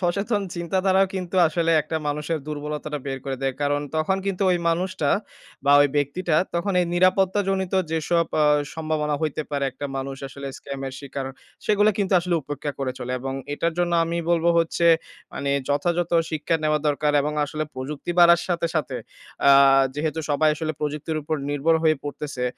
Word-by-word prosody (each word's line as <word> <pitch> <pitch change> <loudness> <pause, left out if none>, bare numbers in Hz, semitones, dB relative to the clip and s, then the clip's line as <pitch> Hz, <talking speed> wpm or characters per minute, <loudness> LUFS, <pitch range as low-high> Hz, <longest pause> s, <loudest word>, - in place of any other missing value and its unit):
সচেতন 200 +4 0
চিন্তাধারাও 190 +3 +2
কিন্তু 185 -1 -4
আসলে 165 +1 0
একটা 160 +2 -3
মানুষের 150 +2 -2
দুর্বলতাটা 150 0 -4
বের 135 -1 -3
করে 135 -1 -3
দেয়। 135 -1 0
কারণ, 145 0 +1 0.2
তখন 155 +5 +1
কিন্তু 195 0 -1
ওই 180 - +2
মানুষটা 175 -2 0 0.6
বা 140 - +5
ঐ - - +8
ব্যক্তিটা 155 +3 0 0.2
তখন 180 +3 0
এই 175 - +1
নিরাপত্তাজনিত 190 +1 +2 0.2
যেসব 165 +1 +1 0.2
আ - - +5 0.3
সম্ভাবনা 155 -2 -1
হইতে 155 0 -1
পারে। 140 -1 -1
একটা 140 +3 -6
মানুষ 135 0 -4
আসলে 140 +1 -8
স্ক্যামের 135 -1 -6
শিকার 140 -1 -5 0.4
সেগুলা 210 0 +4
কিন্তু 195 -1 0
আসলে 175 0 -1
উপেক্ষা 145 +1 -4
করে 135 -2 -2
চলে। 125 +1 -4
এবং 135 0 -4 0.2
এটার 165 +3 -1
জন্য 175 -1 +1
আমি 165 +1 -3
বলবো 170 0 +3
হচ্ছে 165 +1 +1 0.5
মানে 140 - -2 0.2
যথাযথ 170 +4 0 0.2
শিক্ষা 155 +1 0
নেওয়া 155 0 +2
দরকার 150 0 +1
এবং 150 +1 -2
আসলে 155 +2 -3
প্রযুক্তি 140 +5 -5
বাড়ার 170 0 +7
সাথে, 170 -1 0
সাথে 155 -4 -1 0.5
আ - - +9 0.4
যেহেতু 160 +2 -2
সবাই 155 +2 +3
আসলে 155 0 -2
প্রযুক্তির 150 +1 -3
উপর 155 +1 -2
নির্ভর 145 +3 +2
হয়ে 155 -2 +4
পড়তেছে। 145 -3 -4
155 Hz, 165 wpm, -24 LUFS, 145-175 Hz, 0.6 s, আ